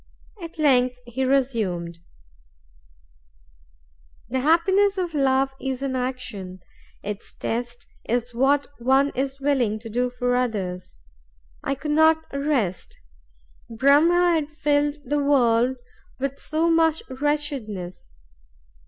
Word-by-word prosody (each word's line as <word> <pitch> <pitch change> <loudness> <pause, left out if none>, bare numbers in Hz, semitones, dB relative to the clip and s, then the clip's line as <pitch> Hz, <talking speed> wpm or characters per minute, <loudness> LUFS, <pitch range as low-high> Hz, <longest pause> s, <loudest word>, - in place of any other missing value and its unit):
At 335 -1 -8
length 255 -5 +3
he 240 +2 -3
resumed: 220 -11 0 2.3
"The 260 +2 0
happiness 380 +7 +3
of 355 -3 -2
love 270 -1 +2
is 265 0 -3
in 265 -1 -2
action; 235 -8 -4 0.4
its 205 0 -7
test 240 +1 -4 0.2
is 240 +1 -1
what 275 +4 +2
one 265 +3 +3
is 270 +1 -3
willing 265 -6 +1
to 225 +1 -9
do 250 +2 0
for 245 0 -1
others. 195 - -2 0.7
I 275 - -1
could 300 +2 -4
not 315 +1 +4
rest. 280 -11 -1 0.7
Brahm 280 +8 +4
had 345 -4 +2
filled 295 -1 0
the 290 +2 0
world 250 -2 +3 0.4
with 275 +1 -3
so 320 +2 0
much 325 -1 +2
wretchedness. 260 - -3
265 Hz, 110 wpm, -24 LUFS, 240-295 Hz, 2.3 s, not